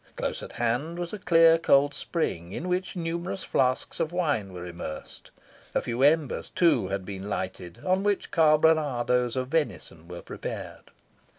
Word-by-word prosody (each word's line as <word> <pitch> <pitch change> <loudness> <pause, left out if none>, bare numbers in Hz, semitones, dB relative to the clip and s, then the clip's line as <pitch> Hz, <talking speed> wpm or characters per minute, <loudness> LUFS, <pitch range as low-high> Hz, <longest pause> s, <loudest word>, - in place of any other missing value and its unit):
Close - - -3
at - - -9
hand 125 +8 -1
was 175 +1 -4
a 210 - -5
clear 165 -2 +5
cold 145 -3 +4
spring, 95 - -3
in 170 - -4
which 180 +1 -1
numerous 170 +2 -3
flasks 130 -1 0
of 160 - 0
wine 145 - 0
were 90 -1 -7
immersed. 85 -3 -8 0.5
A - - +3
few 120 +1 -3
embers, 150 0 +2
too, 170 - +3
had 95 0 -3
been 100 0 -6
lighted, 90 -3 -4
on 185 +1 +2
which 205 -1 -1
carbonadoes 150 -6 +3
of 130 0 -2
venison 100 - -2
were 90 0 -8
prepared. - - -7
145 Hz, 160 wpm, -27 LUFS, 100-165 Hz, 0.5 s, clear